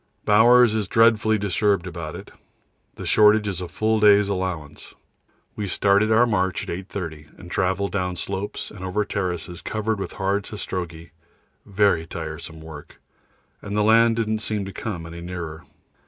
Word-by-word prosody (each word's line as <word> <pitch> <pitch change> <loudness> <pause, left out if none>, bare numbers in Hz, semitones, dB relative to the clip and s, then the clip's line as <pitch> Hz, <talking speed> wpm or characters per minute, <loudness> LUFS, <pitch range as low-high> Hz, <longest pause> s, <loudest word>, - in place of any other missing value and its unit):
Bowers 120 +2 +6
is 110 -3 -1
dreadfully 110 0 +4
disturbed 100 -1 +1
about 85 -3 -6
it. - - -10 0.6
The - - -8
shortage 105 0 +4
is 95 -3 -3
a 90 - -4
full 110 +4 0
day's 105 -1 +5
allowance. 90 -6 -4 0.6
We 105 - -3
started 100 +3 +2
our 115 +2 +5
march 95 -5 -1
at - - -2
8.30, 85 -5 -7
and 85 - -12
travelled 95 +2 0
down 90 -2 -2
slopes 95 +3 -5
and 105 -3 -10
over 95 +3 -1
terraces 90 -3 -4
covered 110 -1 -2
with 95 - -5
hard 100 +1 -1
sastrugi 85 -6 -6 0.6
very 100 -5 +2
tiresome 80 -1 -7
work 80 -2 -11 0.6
and 100 0 -4
the 105 - +3
land 115 +1 +5
didn't 110 -1 -1
seem 105 -2 -3
to 95 - -8
come 90 -7 -5
any 85 +1 -9
nearer. 85 -3 -7
100 Hz, 155 wpm, -23 LUFS, 85-105 Hz, 0.6 s, Bowers